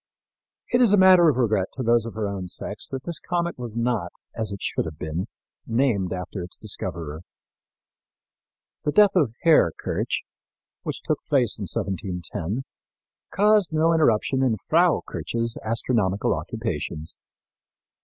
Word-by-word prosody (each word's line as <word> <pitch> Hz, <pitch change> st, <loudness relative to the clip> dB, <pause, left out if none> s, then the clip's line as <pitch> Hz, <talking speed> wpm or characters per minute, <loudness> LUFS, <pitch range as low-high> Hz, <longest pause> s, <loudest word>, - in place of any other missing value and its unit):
It 245 Hz, -, +5 dB
is 230 Hz, -5 st, +5 dB
a -, -, +6 dB
matter 185 Hz, -3 st, +7 dB
of 135 Hz, -, 0 dB
regret 110 Hz, -6 st, +2 dB
to 130 Hz, -, -3 dB
those 115 Hz, -1 st, +3 dB
of 115 Hz, -, -8 dB
her 110 Hz, -2 st, -1 dB
own 95 Hz, -2 st, -4 dB
sex 105 Hz, +3 st, -4 dB
that 135 Hz, -1 st, -5 dB
this 170 Hz, -2 st, -4 dB
comet 170 Hz, -4 st, -2 dB
was 120 Hz, -2 st, -5 dB
not, 115 Hz, -7 st, 0 dB, 0.2 s
as 110 Hz, -2 st, -2 dB
it 100 Hz, -, -5 dB
should -, -, -2 dB
have 80 Hz, -2 st, -7 dB
been, 80 Hz, +4 st, -3 dB, 0.4 s
named 115 Hz, -6 st, +1 dB
after 90 Hz, +1 st, -4 dB
its 85 Hz, -1 st, -7 dB
discoverer. 80 Hz, -2 st, -5 dB, 1.6 s
The 150 Hz, -, 0 dB
death 205 Hz, -2 st, +6 dB
of 140 Hz, -11 st, +2 dB
Herr 160 Hz, -, +5 dB
Kirch, -, -, -2 dB, 0.6 s
which -, -, -5 dB
took -, -, 0 dB
place -, -, +2 dB
in -, -, -4 dB
1710, 95 Hz, +3 st, -3 dB, 0.7 s
caused 210 Hz, -3 st, +3 dB
no 160 Hz, +1 st, +3 dB
interruption 130 Hz, -4 st, +2 dB
in 125 Hz, -4 st, +2 dB
Frau -, -, +3 dB
Kirch's 115 Hz, 0 st, -3 dB
astronomical 110 Hz, -3 st, 0 dB
occupations. 80 Hz, +1 st, -4 dB
115 Hz, 145 wpm, -24 LUFS, 95-155 Hz, 1.6 s, matter